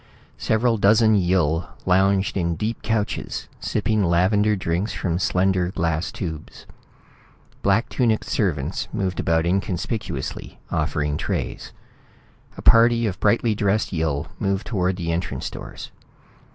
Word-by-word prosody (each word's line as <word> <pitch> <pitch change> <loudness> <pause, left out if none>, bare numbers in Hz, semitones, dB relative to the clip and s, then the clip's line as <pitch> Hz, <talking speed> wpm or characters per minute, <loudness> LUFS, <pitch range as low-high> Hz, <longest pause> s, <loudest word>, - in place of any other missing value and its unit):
Several 115 0 +1
dozen 110 +2 +5
Yill 85 -4 +1 0.2
lounged 95 +1 +2
in 85 -3 0
deep 110 +6 -3
couches, 110 -2 -2
sipping 110 0 0
lavender 100 +5 +3
drinks 90 +2 -2
from 85 -2 -1
slender 95 -1 +1
glass 85 -1 -1
tubes. 80 -5 -7 1.0
Black 100 +4 +2
tunicked 115 -4 +1
servants 80 - -1
moved 95 -4 -2
about 80 0 +1
inconspicuously, 95 - -3
offering 75 0 -1
trays. - - -3 0.9
A - - -8
party 115 0 +5
of 95 -4 -2
brightly 110 +2 +2
dressed 105 0 0
Yill 80 -4 -1
moved 100 +1 -1
toward 95 -5 0
the 85 -2 -3
entrance 85 +2 -3
doors. - - -9
95 Hz, 120 wpm, -23 LUFS, 85-105 Hz, 1.0 s, dozen